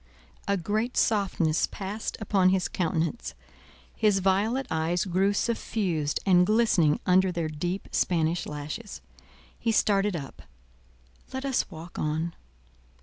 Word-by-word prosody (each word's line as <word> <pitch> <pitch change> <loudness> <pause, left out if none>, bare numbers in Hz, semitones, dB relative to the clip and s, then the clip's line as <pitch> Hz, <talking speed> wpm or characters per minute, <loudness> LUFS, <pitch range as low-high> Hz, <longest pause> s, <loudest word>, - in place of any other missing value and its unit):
A 200 0 +2
great 215 +7 -2
softness 190 -7 +2
passed 205 +3 -5
upon 195 -4 +3
his 185 -1 +1
countenance; 165 +4 -2 0.6
his 210 -3 +3
violet 200 +7 +1
eyes 165 +4 0
grew 190 +2 +2
suffused 195 -8 -1
and 180 -2 +5
glistening 190 -7 +3
under 185 +1 +4
their 170 -3 -2
deep 175 +5 -3
Spanish 165 -1 +1
lashes: 150 +9 -6 0.6
he 230 - +1
started 205 -2 +2
up; 140 -5 -7 0.9
"Let 265 +1 -4
us 270 -2 0
walk 170 -1 -9
on." 160 +2 -1
185 Hz, 120 wpm, -27 LUFS, 165-210 Hz, 0.9 s, and